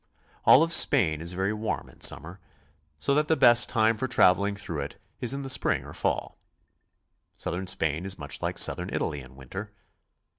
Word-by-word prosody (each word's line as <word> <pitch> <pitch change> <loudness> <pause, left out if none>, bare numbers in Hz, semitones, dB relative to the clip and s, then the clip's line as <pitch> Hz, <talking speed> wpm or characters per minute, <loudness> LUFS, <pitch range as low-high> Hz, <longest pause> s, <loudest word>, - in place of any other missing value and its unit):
All 145 - +7
of 165 0 0
Spain 85 - +4
is 85 +2 -2
very 95 +3 -1
warm 110 0 -4
in - - -20
summer, 85 +6 +1 0.6
so 140 - 0
that 150 +1 +1
the 160 - +2
best 120 -4 +5
time 110 -1 +2
for 130 - -2
traveling 100 -2 +3
through 85 -7 -5
it 70 - -7 0.2
is 125 - -1
in 140 +1 -4
the - - -6
spring - - 0
or - - -10
fall. - - -3 1.0
South - - -4
ern 95 +2 -5
Spain 80 -3 -1
is 95 0 -4
much 70 -3 -7
like - - -3
Southern - - +2
Italy 75 -2 -3
in 65 0 -15
winter. 95 +11 -8
100 Hz, 190 wpm, -26 LUFS, 80-120 Hz, 1.0 s, All